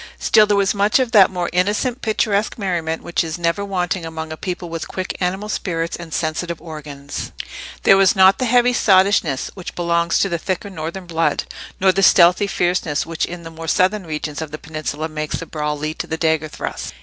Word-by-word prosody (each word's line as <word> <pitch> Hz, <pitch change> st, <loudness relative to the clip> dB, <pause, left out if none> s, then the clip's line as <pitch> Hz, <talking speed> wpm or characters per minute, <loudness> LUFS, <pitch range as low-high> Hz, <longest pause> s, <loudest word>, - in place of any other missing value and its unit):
Still 215 Hz, -1 st, +4 dB
there 205 Hz, -1 st, +2 dB
was 200 Hz, -1 st, +2 dB
much 205 Hz, +1 st, +3 dB
of 255 Hz, -3 st, 0 dB
that 200 Hz, -4 st, +7 dB
more 180 Hz, -2 st, -2 dB
innocent 210 Hz, +8 st, 0 dB
picturesque 215 Hz, -1 st, 0 dB
merriment 170 Hz, -6 st, -2 dB
which 170 Hz, -, 0 dB
is 160 Hz, 0 st, -4 dB
never 170 Hz, +3 st, 0 dB
wanting 185 Hz, -2 st, -2 dB
among 160 Hz, -1 st, -6 dB
a -, -, -4 dB
people 180 Hz, +1 st, -5 dB
with 165 Hz, -1 st, -5 dB
quick 185 Hz, -1 st, -4 dB
animal 190 Hz, +3 st, -1 dB
spirits 170 Hz, -5 st, -2 dB
and 170 Hz, -2 st, -9 dB
sensitive 165 Hz, +1 st, -2 dB
organs: 145 Hz, -3 st, -7 dB, 0.5 s
there 195 Hz, -, +7 dB
was 195 Hz, -2 st, +4 dB
not 190 Hz, 0 st, +6 dB
the 255 Hz, -, +1 dB
heavy 245 Hz, +1 st, +4 dB
sottishness 190 Hz, -, +3 dB
which 185 Hz, -3 st, -8 dB
belongs 170 Hz, -1 st, +1 dB
to -, -, +2 dB
the 170 Hz, -3 st, -2 dB
thicker 190 Hz, +3 st, -3 dB
northern 170 Hz, +2 st, -6 dB
blood, 165 Hz, -1 st, 0 dB, 0.4 s
nor 190 Hz, 0 st, +5 dB
the 195 Hz, -, 0 dB
stealthy 180 Hz, +1 st, +6 dB
fierceness 175 Hz, -5 st, 0 dB
which 165 Hz, 0 st, -2 dB
in 175 Hz, 0 st, -8 dB
the 165 Hz, -, -8 dB
more 165 Hz, 0 st, -8 dB
southern 185 Hz, +2 st, +1 dB
regions 150 Hz, 0 st, -4 dB
of 160 Hz, -, -5 dB
the 155 Hz, -, -6 dB
peninsula 155 Hz, 0 st, -4 dB
makes 155 Hz, -1 st, -4 dB
the -, -, -6 dB
brawl 150 Hz, -1 st, -3 dB
lead 155 Hz, +1 st, -4 dB
to -, -, -3 dB
the 160 Hz, -, -3 dB
dagger 160 Hz, -1 st, +1 dB
thrust. -, -, -6 dB
175 Hz, 205 wpm, -20 LUFS, 160-195 Hz, 0.5 s, that